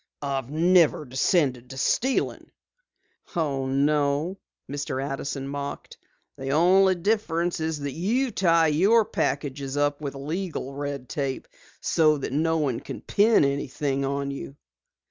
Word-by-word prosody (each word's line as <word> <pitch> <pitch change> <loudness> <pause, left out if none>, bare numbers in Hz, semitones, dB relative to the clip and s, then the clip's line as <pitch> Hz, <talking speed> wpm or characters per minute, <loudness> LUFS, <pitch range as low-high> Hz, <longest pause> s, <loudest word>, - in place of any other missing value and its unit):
"I've 135 -3 -2
never 165 0 +3
descended 130 -1 +1
to 135 - -8
stealing!" 255 - 0 0.9
"No?" 145 +3 0 0.3
Mr. 140 -1 -3
Addison 135 0 -4
mocked. 140 0 -6 0.4
"The 135 0 -4
only 185 +6 +4
difference 175 -3 0
is 160 -2 -2
that 140 0 -3
you 230 - 0
tie 170 -5 +3
your 205 +9 +4
packages 140 -9 -2
up 145 0 +1
with 140 -2 -4
legal 150 0 -4
red 140 -2 -5
tape 135 -1 -3 0.3
so 155 -2 +3
that 135 - -4
no 160 +3 +1
one 135 -7 0
can - - -8
pin 215 -5 +4
anything 140 0 -1
on 140 0 -2
you." 140 0 -7
145 Hz, 125 wpm, -25 LUFS, 140-170 Hz, 0.9 s, only